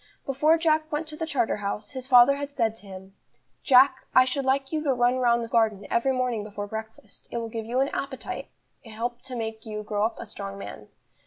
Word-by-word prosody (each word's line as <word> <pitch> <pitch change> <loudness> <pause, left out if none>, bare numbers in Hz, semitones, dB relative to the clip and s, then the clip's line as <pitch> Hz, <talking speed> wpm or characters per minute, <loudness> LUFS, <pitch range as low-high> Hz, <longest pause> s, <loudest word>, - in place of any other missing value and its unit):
Before 300 +4 +3
Jack 315 -1 +1
went 305 +1 -2
to 305 - -7
the 320 +1 -4
Charterhouse, 215 -7 -2
his 260 -1 -7
father 250 +1 +7
had 285 0 -5
said 230 -6 0
to 205 - -15
him: 190 0 -10 0.5
"Jack, 265 +1 +5
I 255 - +8
should 265 +1 -2
like 270 0 +1
you 305 -1 0
to 280 -3 +2
run 245 +1 +2
round 235 -1 +3
the - - -5
school 230 0 +3
garden 210 -3 0
every 235 +3 +2
morning 250 -4 -1
before 205 -1 -6
breakfast, 220 0 -9
it - - -4
will 230 -1 -3
give 225 -1 -5
you 250 +3 +1
an 275 - +1
appetite 270 -2 -5 0.4
and 225 -3 -12
help 240 +2 -3
to 260 -1 -8
make 220 -1 -4
you 210 -1 -5
grow 210 -1 -1
up 225 +1 0
a - - -6
strong 200 -2 -7
man." 110 - -9
240 Hz, 230 wpm, -26 LUFS, 220-270 Hz, 0.5 s, I